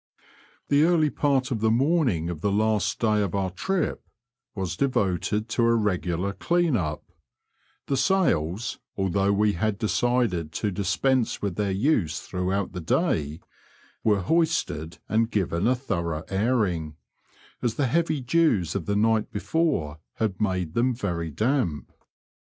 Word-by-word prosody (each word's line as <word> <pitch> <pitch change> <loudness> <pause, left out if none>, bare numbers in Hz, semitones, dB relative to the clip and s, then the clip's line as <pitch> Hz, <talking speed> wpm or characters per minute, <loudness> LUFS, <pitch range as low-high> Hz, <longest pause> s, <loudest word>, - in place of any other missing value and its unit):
The 145 +1 +4
earlj 160 -2 +3
part 135 -3 +1
of 115 -4 -1
tibe 110 0 +3
morning 125 - +1
of 80 -3 -7
the 100 - +1
last 105 -1 +1
day 110 -2 +2
of 100 -2 -2
oar 95 -2 -1
trif 185 - -1 0.6
was 95 -4 -3
devoted 105 -3 0
to 120 - 0
a 115 0 +4
regular 95 -3 -1
clean 170 - +1
up; 80 -7 -2 0.8
the 140 - 0
sails, 120 - +1 0.2
although 95 +1 +1
we 105 +1 +2
had 105 +4 -1
decided 110 -7 0
to 105 +3 -1
dispense 110 +6 0
with 100 -4 -1
thdr 100 -1 -1
use 105 - +1
throughout 95 +1 -2
the 90 - -5
day, 75 -1 0 0.6
were 105 -3 +3
hoisted 100 - 0
and 110 +1 +1
given 95 -2 0
a 130 - +3
thorough 85 - -3
airing, 95 -7 0 0.7
as 120 -2 -1
the 145 - +1
heavy 155 +2 +1
dews 125 - +2
of 100 -5 -4
the 100 - 0
night 110 +1 +2
before 105 - -1
had 105 -4 -2
made 90 -6 -1
them 125 +1 +1
very 85 -7 -3
damp. 105 - -1
105 Hz, 145 wpm, -25 LUFS, 90-125 Hz, 0.8 s, The